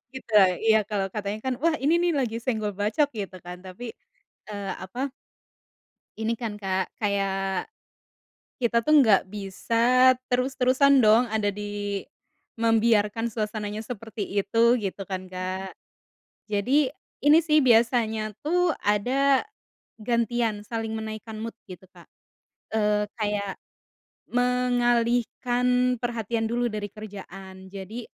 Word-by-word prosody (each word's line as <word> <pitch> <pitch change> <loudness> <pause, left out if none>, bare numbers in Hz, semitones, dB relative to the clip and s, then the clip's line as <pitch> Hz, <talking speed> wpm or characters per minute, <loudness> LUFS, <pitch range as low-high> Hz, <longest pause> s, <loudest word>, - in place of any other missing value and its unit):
Gitu 260 -3 -9
ya, 200 -2 +8
iya, 220 -1 +5
kalo 200 -2 -1
katanya 210 0 -3
kan, 260 -1 0
wah, 330 0 +3
ini 300 +4 +3
nih 350 -1 +2
lagi 230 -3 -2
senggol 220 -4 -2
bacok, 215 +8 +1
gitu 195 -3 -5
kan, 180 0 -8
tapi, 190 +6 -8 0.6
eee, 205 -2 -4
apa 255 +8 -4 1.1
Ini 220 +1 -1
kan, 230 -2 -4
Kak, 190 -2 -2
kayak, 195 -2 -1 0.9
kita 235 -1 +1
tuh 305 - +2
nggak 220 -7 +5
bisa 230 +6 +3 0.2
terus-terusan 260 +2 +3
dong 220 +1 +5
ada 215 -2 +1
di, 205 0 -4 0.6
membiarkan 225 0 +2
suasananya 210 -1 -3
seperti 220 -3 -6
itu, 230 +4 +3
gitu 195 -3 -5
kan, 185 -1 -4
Kak. 185 +1 -4 0.7
Jadi 255 +7 +1 0.3
ini 295 +2 +8
sih 310 -2 +2
biasanya 225 -3 +2
tuh 355 +3 +2 0.2
ada, 260 +7 +3 0.6
gantian, 235 -1 0
saling 225 -1 -3
menaikkan 220 0 -6
mood, 230 0 -5
gitu, 185 -3 -11
Kak, - - -17 0.7
eee, 210 -1 +2
kayak, 205 -2 -2 0.8
mengalihkan 245 0 +1
perhatian 230 -1 -2
dulu 240 +1 0
dari 210 -1 -4
kerjaan, 190 -2 -10
jadi, 200 +5 -7
220 Hz, 120 wpm, -26 LUFS, 205-245 Hz, 1.1 s, ya